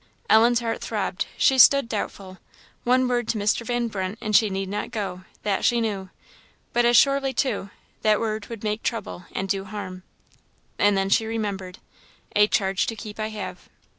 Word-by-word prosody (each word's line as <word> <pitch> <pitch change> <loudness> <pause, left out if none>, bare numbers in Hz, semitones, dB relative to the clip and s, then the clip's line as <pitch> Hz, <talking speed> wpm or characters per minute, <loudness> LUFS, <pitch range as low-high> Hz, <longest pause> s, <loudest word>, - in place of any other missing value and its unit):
Ellen's 235 +2 +5
heart 230 -1 -3
throbbed - - -2
she 265 -2 +4
stood 275 0 +7
doubtful. 195 -3 -5 0.5
One 255 +1 +3
word 240 -2 0
to 225 - 0
Mr. 210 +3 +1
Van 240 0 -1
Brunt, 195 -1 -4
and 215 -1 -1
she 215 0 +5
need 195 0 -3
not 205 +2 -3
go 195 -5 -5 0.2
that 200 -2 0
she 240 - +3
knew. 200 -4 -2 0.6
But 240 0 +3
as 240 0 +5
surely, 275 -1 +3
too, 215 -7 -1 0.3
that 215 -1 +3
word 215 -2 -3
would 230 -2 -8
make 210 0 -1
trouble 205 -5 -4
and 190 - -3
do 195 0 -1
harm. 190 -2 -7 0.8
And 205 -1 +4
then 195 0 0
she 220 +2 +3
remembered, 200 -5 -4 0.6
"A 210 0 +6
charge 195 -2 +1
to 225 - -3
keep 210 0 -9
I 215 - -1
have!" 215 -1 -7
215 Hz, 180 wpm, -24 LUFS, 195-235 Hz, 0.8 s, stood